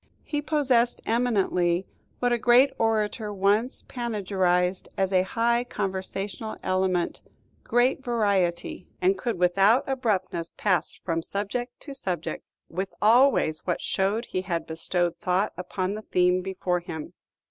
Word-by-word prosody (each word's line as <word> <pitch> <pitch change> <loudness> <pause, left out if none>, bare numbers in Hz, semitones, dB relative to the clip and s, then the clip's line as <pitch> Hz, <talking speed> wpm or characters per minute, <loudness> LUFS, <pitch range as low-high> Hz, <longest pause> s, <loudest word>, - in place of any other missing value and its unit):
He 295 -1 -2
possessed 265 -6 +2
eminently, 195 -7 +1 0.3
what 245 -1 +1
a 240 - +1
great 250 +4 +5
orator 215 -1 0
once 205 +5 +1
panegyrized 190 -6 0
as 190 0 0
a 185 - +5
high 235 +5 +1
conversational 195 0 -4
element, 185 -2 0 0.4
"great 250 +3 +2
variety," 200 -8 0
and 185 +2 +3
could 210 +2 -3
without 195 +7 +4
abruptness 210 -10 -1
pass 185 -6 +1
from 165 -2 -2
subject 210 +7 -4
to 280 - -8
subject, 185 -10 -4 0.2
with 190 +3 -4
always 225 - +4
what 175 - 0
showed 205 +5 0
he 185 - -2
had 175 -3 -2
bestowed 170 +2 -1
thought 185 +4 0
upon 185 +2 -3
the 215 - -5
theme 180 -2 +2
before 185 -1 -1
him. 160 -3 -7
195 Hz, 130 wpm, -26 LUFS, 180-235 Hz, 0.4 s, great